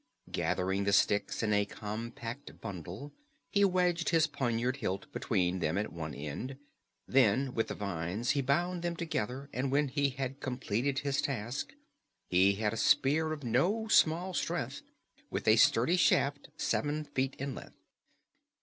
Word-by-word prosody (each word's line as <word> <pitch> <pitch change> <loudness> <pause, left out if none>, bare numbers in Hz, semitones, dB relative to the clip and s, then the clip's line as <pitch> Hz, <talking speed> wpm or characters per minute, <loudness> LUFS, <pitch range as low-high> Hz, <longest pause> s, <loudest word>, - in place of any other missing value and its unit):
Gathering 95 +2 0
the 100 - +2
sticks 100 +3 +2
in 105 -1 +2
a 105 0 +3
compact 115 +5 -6
bundle, 100 - -7 0.4
he 200 - +3
wedged 180 -3 +2
his 165 -2 +4
poniard 125 -3 -1
hilt 95 -7 -3
between 95 -4 0
them 80 +1 0
at 105 -3 -2
one 80 -4 -5
end. 75 - -5 0.5
Then 130 +1 +3
with 115 - 0
the - - -4
vines 100 +3 -2
he 140 - +1
bound 175 +7 0
them 170 0 -2
together, 140 -5 -3
and 130 +1 -1
when 145 0 +2
he 140 +1 +1
had 135 0 -4
completed 130 0 -1
his 140 0 0
task, 120 -1 -3 0.6
he 95 +2 +5
had 105 +1 -1
a - - -4
spear 155 +7 +3
of 150 -2 -5
no 175 - +1
small 175 +1 +4
strength, - - -2 0.5
with - - -4
a 110 +1 +6
sturdy 120 +10 +4
shaft 140 -4 +2
seven 150 +1 0
feet 135 -2 -2
in 140 0 -3
length. - - -10
130 Hz, 155 wpm, -32 LUFS, 105-145 Hz, 0.6 s, a